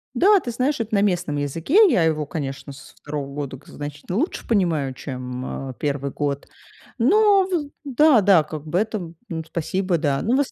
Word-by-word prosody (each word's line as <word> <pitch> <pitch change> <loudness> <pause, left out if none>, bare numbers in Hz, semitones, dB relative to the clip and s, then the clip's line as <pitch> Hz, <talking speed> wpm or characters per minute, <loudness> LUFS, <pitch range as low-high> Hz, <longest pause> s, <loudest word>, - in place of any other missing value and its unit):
Да, 400 +1 +5
ты 240 - -4
знаешь, 260 +3 0
это 220 0 -5
на 200 - +3
местном 175 -7 0
языке. 165 - +3
Я 175 - +3
его, 155 -2 +1
конечно, 140 -2 -5
со 145 - -14
2 145 -2 -5
года 140 -2 -5
к 145 - -22
значительно 145 +6 -6
лучше 315 +8 -2
понимаю, 165 - +1
чем, 130 0 -6
э, - - -6
1 140 -1 -2
год. 140 -1 -3 0.5
Но 395 - +4
в 320 -6 -2 0.2
да, 275 -3 +5
да, 185 -5 +5
как 155 0 -8
бы 170 +4 -1
это. 205 -6 -3 0.3
Спасибо, 185 +2 -1
да. 140 -3 0
Ну 240 +4 +1
в - - +2
ос 275 - -3
165 Hz, 190 wpm, -22 LUFS, 145-235 Hz, 0.5 s, Да